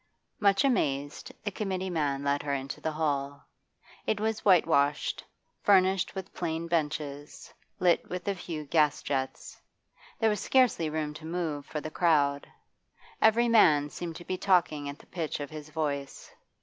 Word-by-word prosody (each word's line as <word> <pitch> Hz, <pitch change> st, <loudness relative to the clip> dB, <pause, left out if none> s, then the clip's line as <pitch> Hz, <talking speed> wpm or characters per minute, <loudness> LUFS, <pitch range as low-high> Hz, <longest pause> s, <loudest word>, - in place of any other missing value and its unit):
Much 200 Hz, +3 st, +4 dB
amazed, 145 Hz, -, -1 dB
the 205 Hz, -, -2 dB
committee 190 Hz, -2 st, -3 dB
man 145 Hz, -4 st, -1 dB
led 140 Hz, 0 st, +1 dB
her 140 Hz, -1 st, -1 dB
into 135 Hz, +1 st, -5 dB
the 160 Hz, -, -1 dB
hall. 140 Hz, -2 st, -2 dB, 0.6 s
It 210 Hz, -, +1 dB
was 220 Hz, 0 st, -1 dB
whitewashed, 150 Hz, -6 st, +3 dB, 0.4 s
furnished 190 Hz, -1 st, +3 dB
with 190 Hz, -1 st, -6 dB
plain 165 Hz, -1 st, -3 dB
benches, 150 Hz, -3 st, -3 dB, 0.2 s
lit 175 Hz, -2 st, +2 dB
with 180 Hz, +1 st, -5 dB
a 200 Hz, -, +2 dB
few 170 Hz, -4 st, -6 dB
gas 150 Hz, -1 st, +2 dB
jets. 135 Hz, -2 st, -4 dB, 0.6 s
There 225 Hz, -1 st, +3 dB
was 210 Hz, -, -1 dB
scarcely 245 Hz, -8 st, +3 dB
room 155 Hz, -1 st, -3 dB
to 155 Hz, +1 st, -10 dB
move 160 Hz, -4 st, -3 dB
for 150 Hz, -, -4 dB
the 155 Hz, -, -6 dB
crowd. 145 Hz, -5 st, +2 dB, 0.7 s
Every 230 Hz, +2 st, +5 dB
man 150 Hz, -11 st, +5 dB
seemed 170 Hz, -2 st, -6 dB
to 175 Hz, -, -10 dB
be 185 Hz, -, -2 dB
talking 155 Hz, -6 st, +2 dB
at 140 Hz, -, -7 dB
the -, -, -18 dB
pitch 165 Hz, -5 st, -4 dB
of 145 Hz, 0 st, -6 dB
his 155 Hz, -1 st, -8 dB
voice. 145 Hz, -3 st, -4 dB
160 Hz, 160 wpm, -29 LUFS, 145-185 Hz, 0.7 s, Every